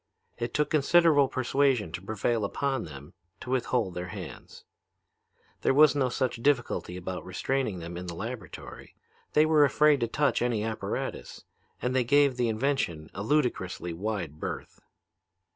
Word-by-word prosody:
It 120 0 -3
took 150 0 +1
considerable 155 -1 +5
persuasion 130 - +1
to 85 - -5
prevail 110 +3 -1
upon 135 +3 -1
them 75 +1 -11 0.3
to 125 - -7
withhold 120 -6 0
their 90 +1 -5
hands. 95 -3 -9 1.0
There 135 - +2
was 150 -2 +7
no 135 -3 +1
such 125 -1 -2
difficulty 120 -9 0
about 90 0 -5
restraining 105 +3 -2
them 85 0 -7
in 90 0 -6
the 85 - -5
laboratory. 110 +1 -8 0.4
They 150 - +5
were 155 -1 +5
afraid 150 0 +4
to 120 - 0
touch 145 +5 +1
any 120 -3 0
apparatus, 110 0 -4 0.4
and 125 +1 0
they 130 - +3
gave 140 +2 +4
the 120 -1 +1
invention 110 - -1
a 100 - -5
ludicrously 105 - 0
wide 90 -5 -4
berth. - - -6
120 Hz, 150 wpm, -28 LUFS, 95-140 Hz, 1.0 s, was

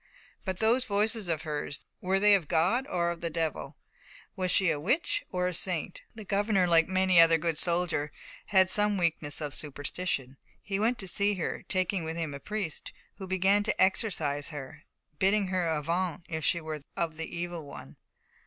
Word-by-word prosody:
But 190 -2 -2
those 235 +5 +2
voices 210 0 0
of 160 -3 -1
hers, 145 -3 -4 0.2
were 190 +1 +1
they 210 +1 +6
of 185 -6 +2
God 185 - +1
or 170 -5 0
of 170 - -7
the 170 - -2
Devil? 160 -1 -3 0.6
Was 185 -1 -1
she 185 -1 +3
witch 260 - 0
or 180 -1 -1
saint? 175 0 -2
The 215 -2 -9
governor, 200 -1 +2
like 165 -2 +4
many 185 -2 +3
another 165 0 +7
good 165 0 -1
soldier, 170 -3 0 0.4
had 190 -2 +5
some 210 +1 +4
weakness 165 -4 0
of 145 -2 -4
superstition. 145 -2 -3 0.2
He 195 0 -3
went 230 +3 +1
to 190 - -6
see 200 +2 +1
her, 175 - -4
taking 185 -1 0
with 160 +1 -4
him 160 -3 -3
a 140 - -6
priest, 205 -1 -5 0.3
who 190 -2 -7
began 190 +2 +3
to 205 - -2
exorcise 160 -8 +1
her, 145 -5 -9 0.3
bidding 195 0 +3
her 185 -2 0
avaunt 165 +2 -1
if 160 -3 -4
she 170 - +2
were 155 -2 -6 0.2
of 165 -2 -2
the 165 +1 -6
Evil 175 -1 -4
One. 70 - -11
180 Hz, 180 wpm, -29 LUFS, 160-195 Hz, 0.6 s, another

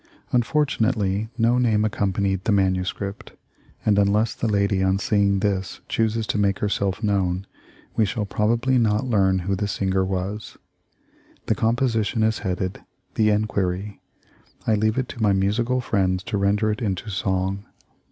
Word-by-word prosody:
Unfortunately 110 -6 +1
no 120 +1 +3
name 110 -3 +2
accompanied 100 -2 -1
the - - +2
manuscript, 95 0 -1 0.5
and 105 -2 +4
unless 105 +3 +2
the 115 - -2
lady 100 -2 +1
on 95 0 +2
seeing 100 -3 +1
this 100 -2 -1
chooses 115 0 0
to 105 - -1
make 100 -1 +2
herself 100 0 -1
known, 95 -2 0 0.5
we 110 - +3
shall 105 +1 -1
probably 115 +6 +1
not 110 +1 +1
learn 95 -6 +2
who 100 0 0
the 105 +2 -2
singer 95 -1 0
was. 95 +3 -4 0.9
The - - +2
composition 115 -2 +1
is 110 0 +1
headed, 95 -1 -3 0.3
"The 110 -1 +3
Enquiry." 100 -2 -1 0.6
I 110 - +2
leave 110 +2 +1
it 130 -2 0
to 115 - -8
my 105 -2 +4
musical 115 +6 +1
friends 95 -5 0
to 105 - -2
render 105 +2 +2
it 105 - -4
into 105 -1 -2
song. 95 +1 -1
105 Hz, 150 wpm, -23 LUFS, 95-110 Hz, 0.9 s, and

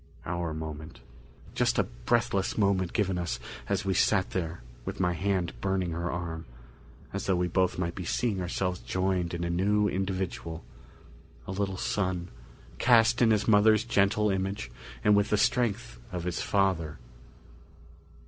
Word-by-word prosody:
Our 85 -2 -2
moment. 80 -1 -6 0.5
Just - - +1
a - - +4
breathless - - 0
moment 100 -4 +2
given 95 -5 0
us 85 -8 -2 0.3
as 100 0 0
we 95 - +1
sat 95 0 +2
there 85 -7 -3 0.2
with - - -5
my 90 0 +2
hand 90 -1 0
burning 95 -2 0
her 85 +1 -2
arm, 85 -1 -4 0.7
as - - -3
though 95 - +3
we 90 0 +1
both 95 +1 +1
might 85 -1 -1
be 95 - -6
seeing 105 +1 0
ourselves 90 0 -1
joined 90 -2 -1
in 85 - -3
a 85 - -1
new 105 +4 +2
individual 95 -4 -3 0.8
a - - -5
little 95 -1 -2
son, 90 -3 -1 0.5
cast 120 0 +5
in 115 - +6
his 110 -2 +2
mother's 110 0 +5
gentle 105 -2 +2
image 95 -9 -2 0.3
and 105 - +5
with 100 0 +2
the 105 - +3
strength 105 - 0
of 90 -2 -4
his 90 -1 -2
father. 90 -6 +1
95 Hz, 155 wpm, -29 LUFS, 85-100 Hz, 0.8 s, in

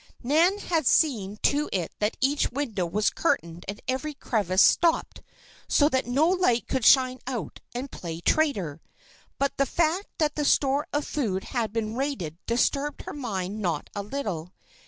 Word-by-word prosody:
Nan 325 +10 +3
had 330 -8 0
seen 215 -10 +2
to 295 +1 +2
it 180 -4 -2
that 210 +1 0
each 280 +2 +2
window 230 -10 -2
was 205 +5 +1
curtained 170 +2 -1
and 205 +2 -5
every 275 +4 -2
crevice 200 -8 +2
stopped, 335 -1 +2 0.5
so 290 - +4
that 260 -3 0
no 275 +6 +3
light 355 -10 +2
could 260 -2 -1
shine 255 +1 +5
out 235 - -4 0.2
and 255 +3 -4
play 165 -2 -6
traitor. 185 - 0 0.6
But 280 0 -1
the 275 - +2
fact 340 +4 0
that 300 -2 +1
the 300 - -2
store 280 0 +2
of 290 0 -1
food 200 -10 -2
had 230 -4 -2
been 220 0 -2
raided 245 - -3
disturbed 280 +5 0
her - - -7
mind 210 -7 -4
not 170 -6 -2
a 205 - -3
little. 200 - -4
255 Hz, 165 wpm, -26 LUFS, 200-290 Hz, 0.6 s, shine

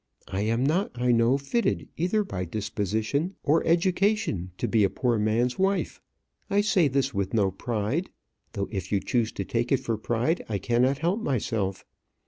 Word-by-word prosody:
I 95 - -2
am 115 +4 +1
not, 175 +8 +1
I 125 0 +3
know, 120 +3 +4
fitted, 140 - -1
either 185 +6 +1
by 90 - -4
disposition 110 - -2
or 160 +3 +3
education, 180 - +1
to - - -1
be 110 -3 +3
a 100 - +3
poor 120 0 0
man's 115 - +1
wife. 195 +1 0 0.5
I 200 +1 +3
say 195 -6 +3
this 135 0 0
with 100 +1 -1
no 100 -3 +3
pride; 115 - -2 0.4
though 100 -3 -2
if 95 -3 -4
you 100 - +3
choose 115 +1 0
to 100 - -4
take 120 +4 -1
it 135 - +5
for 115 -2 -2
pride, 120 +10 0
I 105 - 0
cannot 120 +7 +2
help 175 +8 0
myself. 110 - -1
120 Hz, 175 wpm, -26 LUFS, 105-165 Hz, 0.5 s, it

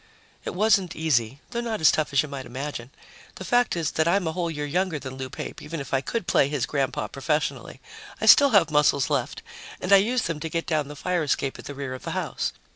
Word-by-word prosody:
It - - -4
wasn't 195 -3 +2
easy, 135 -5 0
though 235 -1 -2
not 230 -2 -3
as 160 - +6
tough 155 -1 -1
as 140 0 +3
you - - -6
might 140 -2 -7
imagine. 130 -1 -6 0.5
The 190 - -8
fact 245 0 +2
is 165 -3 -1
that 160 +1 +1
I'm 185 +2 +2
a 160 - 0
whole 170 0 -2
year 150 -2 -4
younger 180 +2 -1
than 130 -2 -7
Lou 130 0 -6
Pape, 130 - -7
even 165 +2 -6
if 140 -1 -7
I 135 - +2
could 205 - -3
play 140 - +3
his 145 -4 -1
grandpa 140 -2 -1
professionally. 150 +2 -2 0.4
I - - -1
still 285 -1 +8
have 200 -9 +4
muscles 150 -1 +3
left 135 -3 -2 0.4
and 185 +2 +1
I - - +10
used 230 +5 +1
them 165 -2 -3
to 160 - -4
get 165 +1 -2
down 155 -3 0
the 150 - -9
fire 180 +4 -1
escape 140 -2 -1
at - - -10
the 145 - -7
rear 135 -2 -5
of 130 - -8
the - - -5
house. - - -2
150 Hz, 245 wpm, -25 LUFS, 140-180 Hz, 0.5 s, I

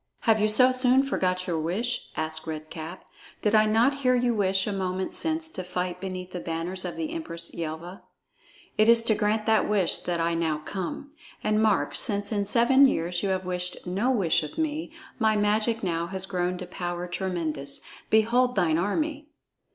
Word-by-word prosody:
"Have 220 -2 +3
you 210 - +3
so 255 +4 +6
soon 255 +1 +4
forgot 185 -8 -1
your 170 -3 -1
wish?" 195 +10 -2
asked 160 0 -3
Red 155 -1 -6
Cap. 165 +3 -8 0.4
"Did 210 - +2
I 215 0 +5
not 240 +6 +3
hear 255 -2 +3
you 245 -1 +2
wish 190 -3 +1
a 210 - -2
moment 185 -1 -2
since 320 0 -1
to 185 - -5
fight 180 0 -3
beneath 185 -1 -5
the 180 - -5
banners 170 +3 -3
of 180 - -4
the 315 -2 -3
Empress 170 - -5
Yelva? 170 +3 -6 0.8
It 215 +1 +5
is 230 0 +6
to 230 - +2
grant 215 0 0
that 220 -2 +3
wish 195 -5 +1
that 175 -1 -2
I 165 0 +1
now 165 -2 0
come. 190 - -6 0.3
And 215 0 +2
mark, 215 -3 +2
since 205 -2 +1
in 205 -2 0
seven 240 +6 +5
years 175 -6 0
you 200 - -1
have 185 -1 -1
wished 180 0 -3
no 195 +8 0
wish 200 -11 +2
of 150 -1 -8
me, 315 0 -2 0.3
my 220 -2 +3
magic 215 +2 +1
now 170 -2 -1
has 190 +1 -2
grown 180 -1 -1
to 180 - -6
power 175 0 -4
tremendous. 165 -6 -2 0.3
Behold 245 +3 +3
thine 160 -2 +2
army!" 295 - -1
190 Hz, 190 wpm, -26 LUFS, 175-230 Hz, 0.8 s, so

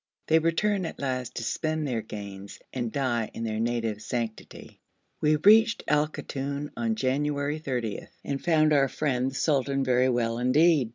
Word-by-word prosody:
They 160 +1 +4
return 180 +3 +1
at - - -8
last 130 -3 -3
to 115 - -4
spend 155 +5 -1
their 120 -5 -1
gains 100 -2 -8 0.2
and 120 -3 -2
die 120 -5 -1
in 115 - -4
their 110 -1 -2
native 115 -2 -1
sanctity. 115 -2 -5 0.4
We 155 0 +4
reached 220 +8 +5
Al 150 0 +3
Koton 140 -1 -5
on 230 -1 -1
January 145 -1 -1
30, 125 -8 -3 0.2
and 140 -1 -3
found 155 -2 +3
our 140 -2 +4
friend 130 -2 -1
the 135 - -10
sultan 135 -2 +1
very 130 0 +3
well 120 -1 0
indeed. 140 +1 +4
135 Hz, 165 wpm, -27 LUFS, 120-155 Hz, 0.4 s, reached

